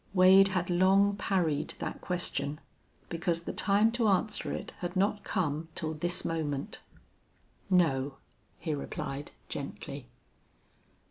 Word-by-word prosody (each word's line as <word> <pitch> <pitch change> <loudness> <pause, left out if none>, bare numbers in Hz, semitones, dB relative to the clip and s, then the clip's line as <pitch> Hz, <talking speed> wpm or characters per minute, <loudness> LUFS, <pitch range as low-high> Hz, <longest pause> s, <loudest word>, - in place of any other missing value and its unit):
Wade 190 +1 +8
had 185 -2 -1
long 195 +3 +4
parried 175 -7 0
that - - -5
question, 175 -5 -2 0.5
because 170 0 -1
the - - -4
time 205 +3 +3
to 235 -1 +1
answer 210 +2 +1
it - - -5
had 175 +1 -4
not 205 +2 +1
come 160 -4 -1
till 160 -1 -2
this 175 +3 -1
moment. 150 -4 -3 0.9
"No," 145 -7 +2 0.4
he 160 - -3
replied, 140 0 -5 0.2
gently. - - -6
175 Hz, 120 wpm, -30 LUFS, 155-195 Hz, 0.9 s, Wade